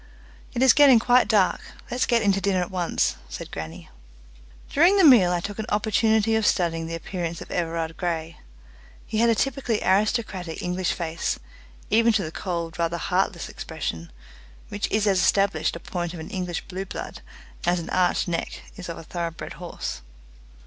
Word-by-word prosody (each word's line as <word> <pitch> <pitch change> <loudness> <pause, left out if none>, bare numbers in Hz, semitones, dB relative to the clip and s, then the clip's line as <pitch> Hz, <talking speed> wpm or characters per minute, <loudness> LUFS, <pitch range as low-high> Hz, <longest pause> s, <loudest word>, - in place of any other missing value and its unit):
"It 245 - +2
is 260 -3 +7
getting 280 -4 +7
quite 245 +2 +4
dark. 205 -4 +3 0.3
Let's 250 +1 0
get 235 -2 +3
in 200 - +4
to 195 0 0
dinner 190 -2 +1
at 180 - -4
once," 175 - 0
said - - -7
grannie. 80 -4 -8 0.8
During 345 +7 +4
the 390 - +5
meal 235 - +7
I 175 - +1
took 205 +3 -6
an 215 - -3
opportunity 220 +1 +2
of 220 - +1
studying 165 -5 +1
the 165 - -4
appearance 170 0 -4
of - - -10
Everard 165 -1 -2
Grey. 165 -2 -3 0.7
He 215 - -2
had 235 +1 +4
a 230 - +4
typically 245 -3 0
aristocratic 195 -4 0
English 180 0 -1
face, 165 -1 -2 0.5
even 230 +2 +5
to 210 -3 +1
the 155 - -5
cold 170 -1 -4
rather 170 0 0
heartless - - -1
expression, 85 0 -5 0.6
which 205 - -3
is 215 0 +1
as 195 -3 +3
established 195 0 +2
a - - -6
point 175 0 -4
of - - -8
an 160 +5 -8
English 180 -4 -3
blue 190 +1 -5
blood - - -7 0.4
as 175 +1 +2
an 165 - -7
arched 185 0 +2
neck 170 -1 -3
is 185 -3 -8
of 170 - -5
a - - -9
thoroughbred 170 0 -5
horse. - - -5
185 Hz, 180 wpm, -25 LUFS, 170-220 Hz, 0.8 s, is